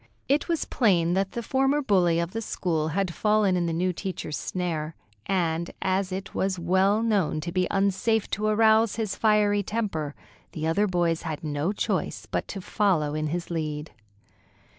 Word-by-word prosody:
It 285 +2 +2
was 335 -2 0
plain 175 -8 +2
that 195 +1 0
the 235 - -3
former 270 +4 +2
bully 185 - +3
of 170 +1 -2
the 225 - -3
school 165 -7 -1
had 180 +2 -1
fallen 210 -2 +2
in 175 -1 0
the - - -1
new 180 +3 0
teacher's 180 -4 -4
snare, 165 -4 -3 0.3
and 170 -3 0
as 190 0 0
it 190 +2 -5
was 190 -1 0
well 190 +5 +2
known 200 -9 +1
to 170 - -4
be 185 0 +1
unsafe 200 +3 +1
to 215 +1 0
arouse 220 0 +4
his 215 -3 -2
fiery 210 -2 +3
temper, 195 -9 -3 0.4
the 155 - -3
other 200 +6 +2
boys 175 -3 +1
had 160 -2 -5
no 150 +3 -1
choice 210 - -2
but - - -3
to 195 - -6
follow 180 -7 +1
in 155 0 -1
his 170 +3 -3
lead. 155 -2 -3
185 Hz, 175 wpm, -26 LUFS, 165-210 Hz, 0.4 s, arouse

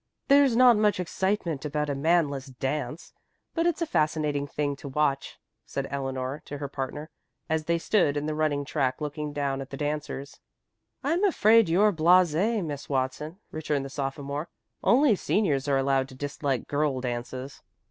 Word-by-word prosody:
"There's 280 -3 +6
not 245 -2 +7
much 210 -3 +2
excitement 180 -4 -1
about 150 0 -1
a 145 - -1
manless 145 -2 +1
dance, 135 +4 -4 0.4
but 330 0 +1
it's 345 0 0
a - - 0
fascinating 150 - 0
thing 145 0 -2
to 140 - -9
watch," 140 0 -1 0.3
said - - -4
Eleanor 135 0 -3
to 145 - -6
her 140 0 -4
partner, 145 +3 -5 0.4
as 160 -1 -1
they 170 +1 +2
stood 165 -5 +2
in 145 - -2
the 155 - -1
running 150 -2 0
track 130 -1 -1
looking 150 0 -4
down 140 -2 -2
at 135 - -8
the 135 - -7
dancers. 145 -1 -4 0.6
"I'm 330 +7 +1
afraid 225 - +5
you're 205 +5 +4
blasé, 180 +5 +3
Miss 145 -2 -6
Watson," 135 +5 -2
returned 150 -3 -2
the - - -6
sophomore. 140 +3 -4 0.3
"Only 255 -2 +5
seniors 150 -9 0
are 140 -1 +3
allowed 135 0 +1
to 130 - -12
dislike 140 -2 -2
girl 145 -2 0
dances." 125 +2 -5
150 Hz, 165 wpm, -27 LUFS, 140-170 Hz, 0.6 s, not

